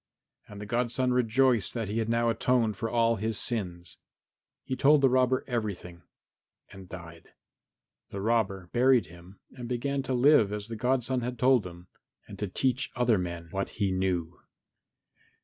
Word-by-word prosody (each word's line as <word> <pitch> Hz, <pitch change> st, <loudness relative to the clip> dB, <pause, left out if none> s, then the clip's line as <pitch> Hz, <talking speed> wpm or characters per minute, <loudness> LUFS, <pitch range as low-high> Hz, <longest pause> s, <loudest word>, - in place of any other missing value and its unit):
And 105 Hz, -1 st, -11 dB
the 105 Hz, -, -6 dB
godson 125 Hz, +3 st, 0 dB
rejoiced 125 Hz, -2 st, +2 dB
that 115 Hz, -3 st, -2 dB
he 105 Hz, +3 st, -2 dB
had 110 Hz, 0 st, -2 dB
now 115 Hz, 0 st, +2 dB
atoned 115 Hz, -1 st, +1 dB
for 115 Hz, +3 st, -3 dB
all 115 Hz, 0 st, +2 dB
his 110 Hz, +1 st, -2 dB
sins. 90 Hz, -7 st, -4 dB, 0.7 s
He 130 Hz, -, -3 dB
told 145 Hz, +2 st, +4 dB
the 135 Hz, -, +5 dB
robber 130 Hz, 0 st, +2 dB
everything 100 Hz, -8 st, -4 dB, 0.7 s
and 95 Hz, -1 st, -12 dB
died. 85 Hz, -2 st, -11 dB, 0.8 s
The 100 Hz, -, -6 dB
robber 100 Hz, -4 st, -1 dB
buried 125 Hz, 0 st, +4 dB
him 85 Hz, +4 st, -15 dB
and 125 Hz, -2 st, -8 dB
began 135 Hz, +3 st, -1 dB
to 130 Hz, -1 st, -2 dB
live 125 Hz, -5 st, +5 dB
as 105 Hz, +1 st, -5 dB
the 115 Hz, -, -5 dB
godson 125 Hz, +2 st, 0 dB
had 125 Hz, +1 st, -4 dB
told 125 Hz, -5 st, +3 dB
him, 85 Hz, 0 st, -12 dB, 0.4 s
and -, -, -11 dB
to 105 Hz, -, -2 dB
teach 130 Hz, +7 st, -1 dB
other 120 Hz, -4 st, +2 dB
men 85 Hz, -2 st, -5 dB
what 95 Hz, 0 st, -2 dB
he 100 Hz, -3 st, +1 dB
knew. 90 Hz, -3 st, -2 dB
115 Hz, 165 wpm, -28 LUFS, 95-125 Hz, 0.8 s, the